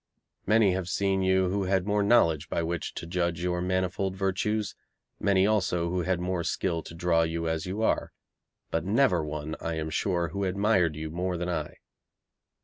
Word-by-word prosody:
Many 105 Hz, -1 st, +5 dB
have 90 Hz, -1 st, -3 dB
seen 95 Hz, +1 st, +1 dB
you 95 Hz, -1 st, +3 dB
who 100 Hz, +1 st, -1 dB
had 95 Hz, -1 st, +1 dB
more 105 Hz, 0 st, +1 dB
knowledge 85 Hz, -8 st, +3 dB
by 85 Hz, -, -1 dB
which 85 Hz, -1 st, -3 dB
to -, -, -5 dB
judge 85 Hz, -1 st, -1 dB
your 90 Hz, 0 st, 0 dB
manifold 95 Hz, +1 st, -1 dB
virtues, 100 Hz, +2 st, -1 dB, 0.5 s
many 100 Hz, -1 st, +3 dB
also 90 Hz, -5 st, +1 dB
who 90 Hz, 0 st, 0 dB
had 90 Hz, +1 st, 0 dB
more 90 Hz, -1 st, -1 dB
skill 85 Hz, -1 st, -1 dB
to 80 Hz, -, -11 dB
draw 85 Hz, -1 st, +2 dB
you 80 Hz, 0 st, -1 dB
as 80 Hz, +1 st, -2 dB
you 100 Hz, +4 st, -2 dB
are, -, -, +1 dB, 0.6 s
but 80 Hz, -, 0 dB
never 100 Hz, -, +3 dB
one, 75 Hz, 0 st, -4 dB
I 85 Hz, 0 st, -2 dB
am 80 Hz, 0 st, -3 dB
sure, 85 Hz, 0 st, 0 dB
who 100 Hz, +5 st, -3 dB
admired 95 Hz, -4 st, +2 dB
you 80 Hz, 0 st, -5 dB
more 90 Hz, +2 st, -2 dB
than 90 Hz, +1 st, -3 dB
I. 80 Hz, -4 st, -3 dB
90 Hz, 185 wpm, -28 LUFS, 85-95 Hz, 0.6 s, Many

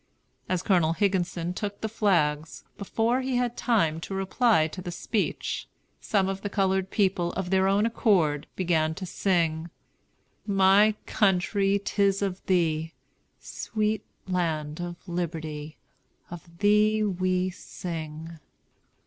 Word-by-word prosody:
As 185 Hz, -1 st, 0 dB
Colonel 175 Hz, -5 st, +3 dB
Higginson 180 Hz, -3 st, 0 dB
took 205 Hz, +1 st, -4 dB
the 220 Hz, -, -1 dB
flags, 165 Hz, -8 st, 0 dB
before 230 Hz, +5 st, 0 dB
he 260 Hz, -1 st, -2 dB
had 245 Hz, -1 st, 0 dB
time 165 Hz, -10 st, +1 dB
to 195 Hz, +4 st, -6 dB
reply 195 Hz, -2 st, +2 dB
to 185 Hz, +4 st, -8 dB
the 180 Hz, -, -6 dB
speech, 205 Hz, +4 st, -2 dB, 0.3 s
some 195 Hz, -3 st, +1 dB
of 195 Hz, 0 st, -3 dB
the 205 Hz, -, -3 dB
colored 190 Hz, -1 st, +1 dB
people, 185 Hz, -4 st, +1 dB
of 190 Hz, -1 st, -3 dB
their 190 Hz, 0 st, +3 dB
own 200 Hz, +2 st, +3 dB
accord, 180 Hz, -, +2 dB
began 160 Hz, -3 st, +1 dB
to 185 Hz, -, -6 dB
sing, 170 Hz, -3 st, 0 dB, 0.8 s
"My 200 Hz, +2 st, +5 dB
country, 195 Hz, 0 st, +2 dB
'tis 200 Hz, -1 st, +1 dB
of 190 Hz, -1 st, -3 dB
thee, 165 Hz, -3 st, +1 dB, 0.4 s
Sweet 215 Hz, -1 st, -2 dB, 0.2 s
land 160 Hz, -4 st, -1 dB
of 175 Hz, +2 st, -7 dB
liberty, 160 Hz, -3 st, -4 dB, 0.5 s
Of 170 Hz, 0 st, -11 dB
thee 210 Hz, +2 st, +3 dB
we 185 Hz, -1 st, 0 dB
sing!" 165 Hz, -3 st, -7 dB
185 Hz, 125 wpm, -27 LUFS, 165-205 Hz, 0.8 s, My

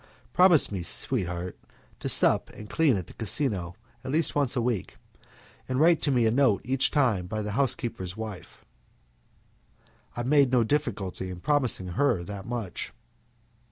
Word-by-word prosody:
Promise 180 Hz, -, +5 dB
me, 95 Hz, -3 st, -3 dB
sweetheart, 90 Hz, -2 st, -2 dB, 0.4 s
to -, -, -4 dB
sup -, -, +4 dB
and 105 Hz, -, -10 dB
sleep 150 Hz, -9 st, +3 dB
at 90 Hz, -, -5 dB
the -, -, -14 dB
casino 100 Hz, -6 st, -1 dB, 0.3 s
at 130 Hz, -, -5 dB
least 160 Hz, +3 st, 0 dB
once 140 Hz, -3 st, +1 dB
a 125 Hz, -, +1 dB
week, 115 Hz, -7 st, -3 dB, 0.7 s
and 130 Hz, 0 st, -1 dB
write 165 Hz, 0 st, +3 dB
me 125 Hz, -4 st, +2 dB
a 110 Hz, -, +3 dB
note 125 Hz, -5 st, +2 dB
each 135 Hz, +1 st, +3 dB
time 115 Hz, -11 st, +1 dB
by 110 Hz, +2 st, -3 dB
the 105 Hz, -, -4 dB
housekeeper's 110 Hz, -6 st, -1 dB
wife." 110 Hz, -4 st, -9 dB, 1.5 s
I 120 Hz, -, -3 dB
made 140 Hz, 0 st, +3 dB
no 125 Hz, -2 st, +4 dB
difficulty 105 Hz, -9 st, -2 dB
in 90 Hz, -1 st, -7 dB
promising 125 Hz, -7 st, 0 dB
her 100 Hz, -1 st, +1 dB
that 100 Hz, +1 st, -8 dB
much. 115 Hz, -6 st, -5 dB
115 Hz, 155 wpm, -27 LUFS, 95-135 Hz, 1.5 s, Promise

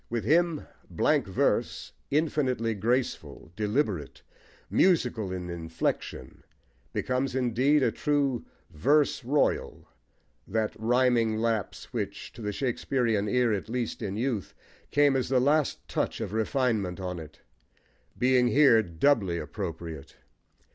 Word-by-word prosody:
With 115 Hz, -2 st, -2 dB
him, 165 Hz, -, +2 dB, 0.2 s
blank -, -, +1 dB
verse, -, -, 0 dB, 0.2 s
infinitely 135 Hz, -6 st, 0 dB
graceful, 115 Hz, -, -2 dB
deliberate, 105 Hz, -, -1 dB, 0.4 s
musical 125 Hz, -, +2 dB
in 90 Hz, -1 st, -4 dB
inflexion, 80 Hz, -1 st, -4 dB, 0.5 s
becomes 130 Hz, 0 st, -1 dB
indeed 130 Hz, +3 st, +2 dB
a -, -, +3 dB
true 140 Hz, -5 st, 0 dB, 0.3 s
"verse 140 Hz, -, +2 dB
royal," 140 Hz, +4 st, 0 dB, 0.6 s
that 110 Hz, +1 st, -1 dB
rhyming 120 Hz, -1 st, +2 dB
lapse, 110 Hz, -2 st, -2 dB
which -, -, -4 dB
to -, -, -11 dB
the 105 Hz, -1 st, -2 dB
Shakespearian 115 Hz, -3 st, 0 dB
ear, 125 Hz, -1 st, +2 dB
at 105 Hz, +1 st, -3 dB
least 120 Hz, -1 st, -3 dB
in 100 Hz, -3 st, -3 dB
youth, 115 Hz, -4 st, -2 dB, 0.3 s
came 145 Hz, -1 st, +4 dB
as 130 Hz, -2 st, 0 dB
the 130 Hz, -1 st, +3 dB
last 145 Hz, +3 st, +1 dB
touch -, -, -2 dB
of 95 Hz, -, -4 dB
refinement 110 Hz, -5 st, 0 dB
on 90 Hz, -2 st, -4 dB
it, 80 Hz, -1 st, -12 dB, 0.8 s
being 125 Hz, 0 st, +3 dB
here 135 Hz, -4 st, +6 dB
doubly 95 Hz, -, +1 dB
appropriate. 85 Hz, -7 st, -6 dB
115 Hz, 120 wpm, -28 LUFS, 100-135 Hz, 0.8 s, here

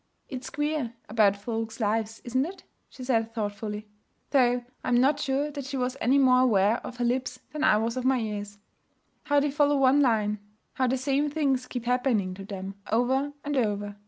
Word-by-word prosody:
'It's 260 Hz, -2 st, -6 dB
queer 295 Hz, -5 st, -2 dB
about 210 Hz, -2 st, +3 dB
folks' 225 Hz, +2 st, -4 dB
lives 220 Hz, 0 st, -1 dB
isn't 255 Hz, +2 st, 0 dB
it?' 385 Hz, +2 st, -10 dB, 0.3 s
she 255 Hz, -, -10 dB
said 225 Hz, -3 st, +1 dB
thoughtfully 210 Hz, 0 st, -4 dB, 0.4 s
though 245 Hz, -3 st, +3 dB, 0.2 s
I -, -, -5 dB
am 245 Hz, -1 st, +4 dB
not 280 Hz, +3 st, +3 dB
sure 285 Hz, +1 st, 0 dB
that 280 Hz, -2 st, -6 dB
she 270 Hz, 0 st, -4 dB
was 250 Hz, 0 st, -1 dB
any 260 Hz, +4 st, +4 dB
more 255 Hz, -2 st, +5 dB
aware 220 Hz, -3 st, +4 dB
of 245 Hz, -, -9 dB
her 245 Hz, -, 0 dB
lips 250 Hz, +1 st, -1 dB
than 305 Hz, 0 st, -3 dB
I 210 Hz, -, +5 dB
was 230 Hz, +2 st, -1 dB
of 255 Hz, -, -2 dB
my 260 Hz, 0 st, +3 dB
ears. 205 Hz, -3 st, -4 dB, 0.7 s
'How 290 Hz, 0 st, +3 dB
they 285 Hz, 0 st, 0 dB
follow 290 Hz, 0 st, +3 dB
one 270 Hz, +1 st, +5 dB
line; 210 Hz, -5 st, +2 dB, 0.3 s
how 260 Hz, -1 st, +1 dB
the 260 Hz, +2 st, +1 dB
same 275 Hz, +3 st, +1 dB
things 275 Hz, -4 st, 0 dB
keep 245 Hz, -2 st, -5 dB
happening 245 Hz, -6 st, +1 dB
to 195 Hz, +1 st, -9 dB
them, 195 Hz, 0 st, -7 dB
over 260 Hz, +5 st, +1 dB
and 290 Hz, 0 st, -1 dB
over. 205 Hz, -4 st, -1 dB
250 Hz, 195 wpm, -27 LUFS, 215-270 Hz, 0.7 s, more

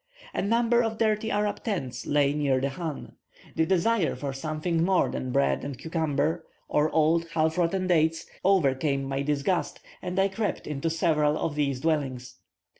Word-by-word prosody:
A -, -, -1 dB
number 235 Hz, +3 st, +3 dB
of 225 Hz, -2 st, -2 dB
dirty 220 Hz, 0 st, +1 dB
Arab 205 Hz, -1 st, -1 dB
tents 135 Hz, -, -3 dB
lay 145 Hz, -1 st, +3 dB
near 140 Hz, -3 st, +1 dB
the 135 Hz, +1 st, -1 dB
chan. 160 Hz, -1 st, -5 dB, 0.4 s
The 160 Hz, 0 st, +2 dB
desire 190 Hz, +1 st, +2 dB
for 140 Hz, -2 st, -4 dB
something 155 Hz, +4 st, -1 dB
more 185 Hz, +1 st, +3 dB
than 130 Hz, -, -4 dB
bread 70 Hz, -, +1 dB
and 140 Hz, -1 st, -5 dB
cucumber, 160 Hz, 0 st, -1 dB, 0.2 s
or 150 Hz, +1 st, +2 dB
old, 165 Hz, +2 st, +2 dB
half 160 Hz, 0 st, +2 dB
rotten 180 Hz, +2 st, +1 dB
dates, 165 Hz, -2 st, +2 dB, 0.2 s
overcame 140 Hz, -7 st, +2 dB
my 135 Hz, 0 st, -2 dB
disgust, 150 Hz, +5 st, -1 dB, 0.2 s
and 180 Hz, 0 st, -4 dB
I 195 Hz, 0 st, +4 dB
crept 205 Hz, +2 st, -3 dB
into 150 Hz, +2 st, -2 dB
several 155 Hz, -2 st, +2 dB
of 160 Hz, -, -2 dB
these 140 Hz, -3 st, -1 dB
dwellings. 135 Hz, -6 st, -2 dB
160 Hz, 165 wpm, -27 LUFS, 140-185 Hz, 0.4 s, I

